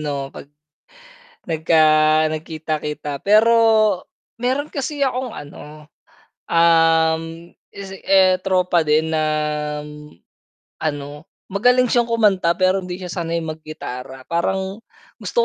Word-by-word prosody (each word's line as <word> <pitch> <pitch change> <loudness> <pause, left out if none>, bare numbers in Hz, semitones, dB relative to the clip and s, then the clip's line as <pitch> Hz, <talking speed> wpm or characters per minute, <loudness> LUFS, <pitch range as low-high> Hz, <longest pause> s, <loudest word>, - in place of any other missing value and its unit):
ano, 140 -2 -4
'pag 140 - -11 1.0
nagka 160 0 +2 0.5
nagkita-kita 155 -2 -4
pero 215 +3 +5 0.9
meron 260 +5 -1
kasi 290 +1 -4
akong 255 -2 -1
ano, 150 +1 -11 0.6
um, 165 0 +2 0.2
eh, 190 -1 +2
tropa 180 -2 +1
din 155 +1 +2
na, 155 -1 0 1.6
ano, 145 -1 -4 0.2
magaling 250 +6 +3
siyang 240 0 +1
kumanta 205 -7 +2
pero 185 +1 +2
hindi 180 0 -6
siya 180 -2 -7
sanay 170 -1 -2
maggitara, 155 -5 -8
parang 190 +4 -2 0.4
gusto - - -7
170 Hz, 95 wpm, -20 LUFS, 155-195 Hz, 1.6 s, pero